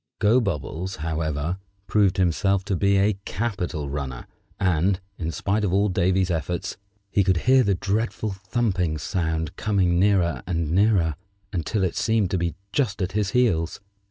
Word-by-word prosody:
Gobobbles, 100 - 0
however, 80 +2 -2 0.3
proved 100 -3 +2
himself 95 +2 +2
to 100 -1 0
be 100 +2 +3
a 100 0 +2
capital 90 -10 -3
runner, 70 -3 -4 0.3
and, 90 0 +2 0.2
in 80 -2 -2
spite 100 +7 -1
of 100 - +1
all 100 +2 +3
Davy's 90 0 +1
efforts, 85 +1 -2 0.4
he 100 - +3
could 95 -2 +2
hear 130 +1 +6
the 100 -5 +2
dreadful 105 +2 -1
thumping 95 -4 -1
sound 80 -1 -2
coming 95 -5 +2
nearer 90 -8 +2
and 85 -4 -1
nearer, 90 -5 +3 0.4
until 95 +3 -1
it 90 - 0
seemed 110 -4 +1
to 95 - +1
be 85 -1 -1 0.2
just 120 -8 0
at 95 -1 -1
his 105 0 0
heels. 100 -9 +1
95 Hz, 155 wpm, -24 LUFS, 85-100 Hz, 0.4 s, hear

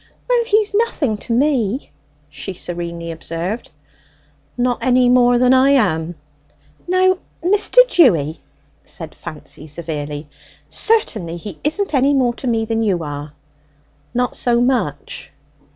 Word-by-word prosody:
"Well, - - +3
he's 425 -2 +2
nothing 330 - 0
to 230 - -6
me," 255 -2 +1 0.4
she 150 +5 -6
serenely 170 -1 -5
observed. 165 +6 -5 0.9
"Not 245 0 0
any 250 -1 +3
more 245 -1 +5
than 250 +1 +4
I 260 +1 +5
am?" 175 - +2 0.7
"Now, 370 0 +3 0.2
Mr. 415 +7 +5
Dewy," 165 - +3 0.4
said - - -7
Fancy 155 - -8
severely, 150 -1 -5 0.4
"certainly 215 - +1
he 175 -1 -8
isn't 355 +5 -1
any 275 +1 +3
more 250 -3 +2
to 255 - -7
me 225 -2 +1
than 225 0 -1
you 190 -6 0
are!" 145 0 -6 0.8
"Not 250 0 0
so 240 -1 +1
much?" 235 - -1
240 Hz, 125 wpm, -19 LUFS, 170-280 Hz, 0.9 s, more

